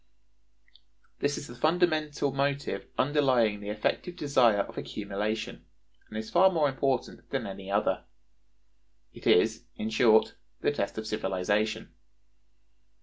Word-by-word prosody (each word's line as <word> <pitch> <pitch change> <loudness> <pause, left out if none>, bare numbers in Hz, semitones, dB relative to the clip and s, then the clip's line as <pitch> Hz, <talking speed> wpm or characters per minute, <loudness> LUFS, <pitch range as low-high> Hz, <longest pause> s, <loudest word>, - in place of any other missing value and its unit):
This 145 0 0
is - - -6
the 120 - -10
fundamental 155 0 +1
motive 140 +1 -1
underlying 130 -7 +2
the 100 0 -7
effective 110 +11 -2
desire 125 - +3
of - - -7
accumulation, 105 0 -4 0.5
and 110 - -6
is 110 0 -5
far 190 +2 +6
more 160 -5 +2
important 135 -2 -2
than 135 -4 -2
any 95 -1 -7
other. 100 -1 0 1.1
It - - -7
is, - - +3
in 110 +1 -4
short, 110 -1 +4 0.3
the - - +2
test 105 -9 -3
of 110 - -4
civilization. 105 +1 -1
120 Hz, 125 wpm, -29 LUFS, 105-145 Hz, 1.1 s, far